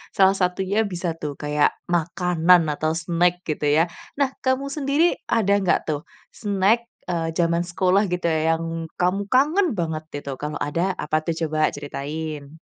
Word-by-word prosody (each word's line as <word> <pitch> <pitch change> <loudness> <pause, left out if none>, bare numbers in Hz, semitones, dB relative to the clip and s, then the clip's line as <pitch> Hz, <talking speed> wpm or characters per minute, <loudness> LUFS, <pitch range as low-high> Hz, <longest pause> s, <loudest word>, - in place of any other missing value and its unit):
salah 190 0 +6
satunya, 190 +3 0
bisa 175 -2 -3
tuh, 145 -2 -4
kayak, 150 0 +1 0.2
makanan 175 -1 +3
atau 155 +2 -1
snack 175 +1 +1
gitu 150 -1 -2
ya. 165 +4 +3 0.2
Nah, 275 -2 +1
kamu 270 +1 0
sendiri, 295 +4 +1
ada 200 -3 +2
nggak 185 -3 +2
tuh, 150 +2 -4 0.2
snack, 205 +3 +1 0.2
eee, 165 -1 -2
jaman 170 0 +1
sekolah, 185 +3 +2
gitu 175 -1 -1
ya, 160 +1 +2
yang 165 0 -4
kamu 195 +3 0
kangen 295 - +3
banget? 160 -3 -3 0.2
Itu, 135 -2 -6
kalau 150 0 -4
ada, 170 +6 -1
apa 155 +1 0
tuh? 160 +1 -3
Coba 155 -1 +1
ceritain. 145 +1 -6
170 Hz, 155 wpm, -23 LUFS, 155-195 Hz, 0.2 s, salah